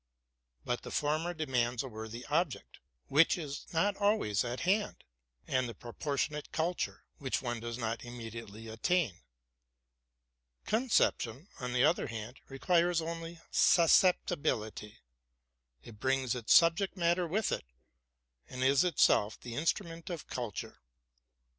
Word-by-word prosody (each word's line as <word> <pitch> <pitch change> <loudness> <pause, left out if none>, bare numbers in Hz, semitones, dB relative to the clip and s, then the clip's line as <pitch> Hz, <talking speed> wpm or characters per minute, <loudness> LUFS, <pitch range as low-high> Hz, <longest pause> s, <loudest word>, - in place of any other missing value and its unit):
But 125 - -1
the - - -8
former 155 +4 0
demands 125 -6 0
a - - -5
worthy 110 +1 -7
object, 155 -1 -1 0.3
which 155 +6 +4
is 150 -4 -6
not 195 +5 +2
always 200 - +2
at 120 +1 -4
hand, 200 +4 0 0.4
and 130 -2 0
a 115 - -8
proportionate 145 +6 -3
culture, 170 +2 -2 0.2
which 135 -3 -2
one 120 -2 -2
does 115 0 -5
not 115 -1 -3
immediately 115 -2 -8
attain. 115 - 0 1.5
Concep 230 +3 +3
tion, 130 - -7
on 125 -1 -3
the 125 0 +3
other - - +3
hand, 115 +2 -7
requires 170 +5 +2
only 165 0 -5
susceptibility: 160 - +3 0.9
it 110 -3 -12
brings 130 0 +1
its 120 -3 -3
subject 170 +4 +4
matter 175 0 +2
with 205 +6 0
it, - - -2 0.8
and 130 0 -3
is 135 +3 +5
itself 110 - +3
the 120 - -8
instrument 165 - -2
of 170 -4 -5
culture. 120 -5 -5
140 Hz, 130 wpm, -32 LUFS, 120-170 Hz, 1.5 s, is